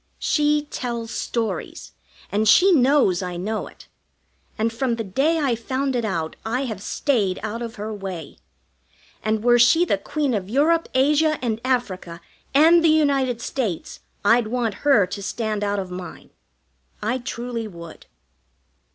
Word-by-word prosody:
She 295 0 +1
tells 235 -2 -4
stories, 230 -2 -4 0.4
and 210 +1 +2
she 385 - +6
knows 260 - +4
I 180 -1 -4
know 215 +5 -3
it; - - -16 0.7
and 225 +1 0
from 235 0 0
the 230 - -3
day 275 - +1
I 280 -6 +1
found 260 +3 -2
it 240 - 0
out 165 -7 -2
I 235 +4 -1
have 220 -7 -5
stayed 205 -6 0
out 220 +2 -4
of 230 -1 -6
her 215 +1 -5
way; 190 -6 -7 0.8
and 215 0 -1
were 240 0 +5
she 325 +9 +5
the 200 - 0
Queen 290 +4 -1
of 195 -3 -3
Europe, 315 +7 +2
Asia, 300 +3 +3
and 225 -2 -1
Africa, 195 -10 -2 0.3
and 325 +4 +6
the 330 - +5
United 275 -6 +2
States 225 - -3 0.3
I'd 230 +1 +4
want 235 -2 -1
her 275 -9 +4
to 200 - -6
stand 215 0 -2
out 205 0 0
of 190 -2 -4
mine. 180 0 -9 0.7
I 235 +4 0
truly 235 -1 -5
would. 170 -4 -11
235 Hz, 155 wpm, -22 LUFS, 205-270 Hz, 0.8 s, she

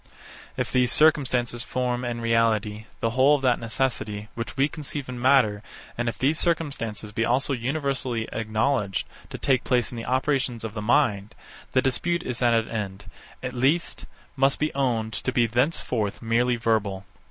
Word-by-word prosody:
If - - -2
these 125 -1 +3
circumstances 130 -6 +3
form, 125 0 -2
in 120 -1 -3
reality, 110 -2 +1 0.2
the 115 - +1
whole 130 +4 +5
of 140 - -4
that 125 -2 +3
necessity, 110 -3 -2
which 115 +3 -6
we 135 +1 +4
conceive 145 -2 -6
in 125 -1 -6
matter, 125 -6 +4 0.3
and 120 0 -1
if 110 - -6
these 145 +7 +1
circumstances 135 - -1
be 115 +2 -1
also 130 +4 +1
universally 130 -2 -2
acknowledged 110 -1 0 0.2
to - - -6
take 130 -3 +1
place 125 -2 +1
in 120 - -7
the 115 - -6
operations 130 -2 0
of 110 -2 -5
the 110 - -4
mind, 110 -2 +1 0.4
the 130 - +3
dispute 170 +6 0
is 125 -1 -4
at 120 -1 +4
an 115 0 +1
end; 100 -3 -5 0.4
at 125 -1 -3
least, 135 +7 0 0.3
must 135 0 +3
be 150 +1 -1
owned 115 -5 0
to 125 - -2
be 120 -2 +3
thenceforth 120 -3 0
merely 120 +2 +1
verbal. 110 -4 0
120 Hz, 170 wpm, -25 LUFS, 115-135 Hz, 0.4 s, whole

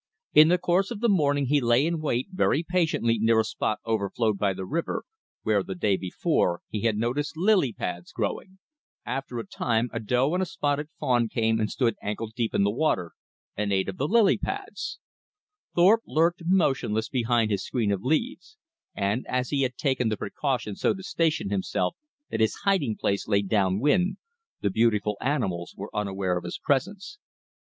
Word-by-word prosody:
In 155 +1 +8
the 180 +2 +4
course 180 +2 +1
of 235 - -5
the 235 - +2
morning 145 -7 +2
he 145 +2 +2
lay 120 +3 +3
in 165 0 -1
wait 130 0 -1
very 175 -4 +1
patiently 160 -11 +1
near 110 +1 +4
a - - +4
spot 110 0 -2
overflowed 110 -1 0
by 100 -2 +2
the 95 0 -5
river, 170 - -2 0.4
where, 105 -2 +2
the 95 0 -6
day 100 +2 +1
before, 90 -1 0
he 105 - -3
had 110 -1 +1
noticed 130 +8 -2
lily 185 - +3
pads 90 -4 -5
growing. 120 - -4 0.5
After 135 -2 -4
a 115 - -4
time 115 +3 -1
a 115 - -2
doe 125 +7 +1
and 180 - +1
a 185 - -1
spotted 145 -2 -1
fawn 120 -3 +1
came 110 0 +1
and 105 -1 0
stood 120 -5 +1
ankle 105 +2 -4
deep 115 -2 -1
in - - +3
the 100 - +2
water, 105 - 0 0.4
and 105 -1 -1
ate 95 -1 +1
of 95 - -5
the 140 - 0
lily 215 0 +4
pads. 330 +13 -5 0.8
Thorpe 195 +6 +5
lurked 170 +3 +2
motionless 130 - +1
behind 120 -3 +1
his 100 -1 0
screen 115 -5 -1
of 100 -2 -1
leaves; 235 - -2 0.4
and 100 +5 0
as 125 0 -1
he 140 -2 +1
had 130 -1 0
taken 130 -5 +1
the 110 - -1
precaution 115 -2 -2
so - - +1
to 190 - -9
station 160 - 0
himself 95 -2 -1 0.4
that - - -2
his 110 -1 +2
hiding 185 - +1
place 100 -1 -1
lay 100 -1 +2
downwind, 115 - +2 0.4
the 100 - 0
beautiful 105 -1 +2
animals 100 -11 -2
were 100 - -8
unaware 95 -3 -1
of - - -15
his - - -5
presence. 195 - -2
120 Hz, 185 wpm, -26 LUFS, 105-155 Hz, 0.8 s, In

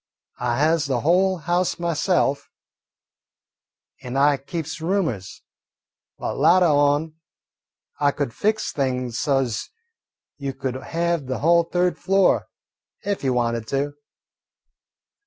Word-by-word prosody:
I 120 -1 0
has 155 +1 +2
the 130 -4 0
whole 185 +4 +3
house 175 +3 0
myself, 155 -4 0 1.5
and 125 +2 -5
I 145 +1 +4
keeps 160 +2 -6
roomers. 160 - -2 0.7
But - - -4
latah 175 -3 +5
on 145 +2 +2 0.8
I 145 - +4
could 140 -4 -3
fix 215 - 0
things 125 -4 -2
so 135 -3 +2
's 115 -4 -4 0.7
you 140 -2 -4
could 135 -2 -3
have 165 +2 -2
the 130 - -2
whole 170 +2 +4
third 180 +1 0
floor 195 -1 +2 0.6
ef 200 -5 -2
you 130 -2 +1
wanted 115 -2 -1
to. 140 +3 -1
145 Hz, 120 wpm, -23 LUFS, 135-170 Hz, 1.5 s, latah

